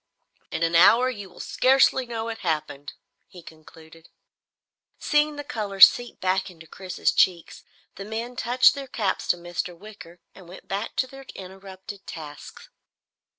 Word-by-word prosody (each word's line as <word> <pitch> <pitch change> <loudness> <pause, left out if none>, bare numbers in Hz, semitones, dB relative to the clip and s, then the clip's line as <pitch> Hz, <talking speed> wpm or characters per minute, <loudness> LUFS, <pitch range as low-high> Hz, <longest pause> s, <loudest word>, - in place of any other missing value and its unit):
"In 165 - -3
an 165 0 0
hour 225 +9 +5
you 205 -5 -9
will - - -18
scarcely 260 0 +2
know 230 -1 -4
it 225 - -6
happened," 155 -3 -4 0.3
he 175 -2 -14
concluded. 160 0 -16 0.9
Seeing 300 0 +1
the 290 - -6
color 210 -7 -5
seep 240 +5 +6
back 190 +1 0
into 165 -3 -15
Chris's 180 +2 -2
cheeks, 175 -3 0 0.3
the 195 - -6
men 230 +3 -5
touched 250 +2 +4
their 275 -1 -7
caps 210 -7 -2
to - - +2
Mr. 175 0 -5
Wicker 200 -3 -13
and 185 -3 -15
went 185 - -13
back 200 +3 -4
to - - +1
their 270 0 -13
interrupted 190 +1 -11
tasks. 150 -4 -10
195 Hz, 150 wpm, -24 LUFS, 170-235 Hz, 0.9 s, seep